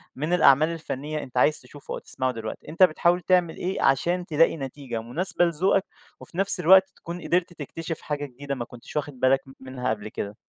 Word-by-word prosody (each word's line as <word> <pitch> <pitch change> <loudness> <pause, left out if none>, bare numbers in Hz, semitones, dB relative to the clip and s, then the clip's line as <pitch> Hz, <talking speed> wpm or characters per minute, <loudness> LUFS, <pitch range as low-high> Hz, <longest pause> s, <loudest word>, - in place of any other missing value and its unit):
من 155 +6 -2
الأعمال 155 -1 +5
الفنية 155 -2 -4
أنت 125 -1 -9
عايز 150 +4 +3
تشوفه 145 -1 -10
أو - - -4
تسمعه 130 0 -2
دلوقتي، 115 -2 -7
أنت 170 +4 +3
بتحاول 175 +1 +3
تعمل 175 -1 +2
إيه 185 +2 -3
عشان 175 +7 +2
تلاقي 165 0 +3
نتيجة 135 -4 -5
مناسبة 175 +9 +1
لذوقك 185 +4 +1 0.3
وفي 175 - -12
نفس 195 -1 +1
الوقت 190 +2 +6
تكون 170 +1 -8
قدرت 175 0 0
تكتشف 165 +2 -6
حاجة 145 -1 -3
جديدة 140 +1 -6
ما 120 -2 -4
كنتش 120 +4 -13
واخد 145 -3 -3
بالك 130 +1 +4
م 135 - -13
منها 130 -1 -4
قبل 110 -1 -3
كده؟ 100 0 -6
150 Hz, 195 wpm, -25 LUFS, 130-175 Hz, 0.3 s, الوقت